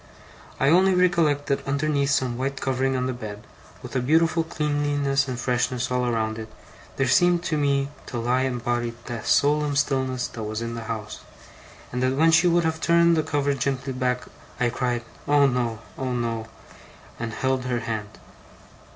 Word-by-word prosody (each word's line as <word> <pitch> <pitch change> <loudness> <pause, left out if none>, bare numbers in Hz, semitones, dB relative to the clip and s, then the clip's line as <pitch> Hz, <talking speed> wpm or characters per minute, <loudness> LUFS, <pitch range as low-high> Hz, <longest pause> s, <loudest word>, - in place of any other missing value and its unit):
I 135 - +3
only 185 +3 +5
recollect 170 -6 +2
that 140 -1 -2
underneath 140 0 +1
some 130 -3 +1
white 135 +2 -3
covering 135 0 0
on 125 0 0
the 130 - -1
bed, 105 -3 -7 0.4
with - - -8
a - - +3
beautiful 160 +5 +3
cleanliness 145 -3 0
and 125 -2 -4
freshness 125 0 -1
all 125 0 +1
around 110 -2 -1
it, 110 0 -8 0.4
there 135 - +1
seemed 175 -3 +4
to 160 - -1
me 140 -2 +1 0.2
to 120 - -5
lie 120 +2 +1
embodied 120 -2 -1
the 120 -2 -5
solemn 145 0 +2
stillness 130 -3 0
that 115 - -8
was 110 0 -3
in 115 0 -4
the 115 -1 -6
house; 110 -2 -5 0.7
and 125 - -2
that 130 +1 +1
when 160 +3 +4
she 175 +2 +5
would 175 0 +3
have 160 0 -1
turned 170 0 +4
the 160 - +2
cover 145 -2 0
gently 135 0 -2
back, 125 0 -1 0.4
I 120 -1 +2
cried: 120 -1 -1 0.2
'Oh 145 -1 +5
no! 120 -4 0 0.2
oh 130 -1 -2
no!' 115 -2 -2 0.7
and 115 -1 -3
held 130 +1 -1
her 120 -2 -1
hand. 110 -3 -5
130 Hz, 175 wpm, -24 LUFS, 120-145 Hz, 0.7 s, only